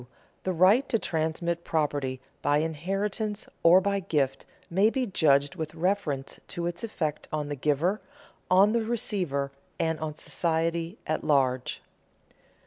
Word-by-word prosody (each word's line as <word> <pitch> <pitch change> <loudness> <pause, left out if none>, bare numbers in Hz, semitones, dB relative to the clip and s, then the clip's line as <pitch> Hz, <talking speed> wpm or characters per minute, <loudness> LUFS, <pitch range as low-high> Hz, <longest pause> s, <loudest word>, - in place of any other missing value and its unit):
_The 185 -3 -1
right 210 +9 +5
to 225 - +3
transmit 170 -1 -1
property 145 -4 -1 0.2
by 145 0 +3
inheritance 195 +7 -2
or 170 +2 +7
by 200 +1 0
gift 140 -7 -1 0.2
may 195 +5 +3
be 260 +2 -1
judged 145 - +3
with 160 -2 -5
reference 165 -6 -1
to 170 - -3
its 175 +2 -4
effect 155 -9 -3
on 150 -1 -2
the 145 - -2
giver, 155 +9 +1 0.5
on 195 +3 +6
the 235 +1 +2
receiver, 180 -11 -1 0.3
and 160 -1 0
on 155 -1 -4
society 165 +4 -1
at 155 - -1
large. 130 -3 +1
165 Hz, 135 wpm, -28 LUFS, 150-195 Hz, 0.5 s, or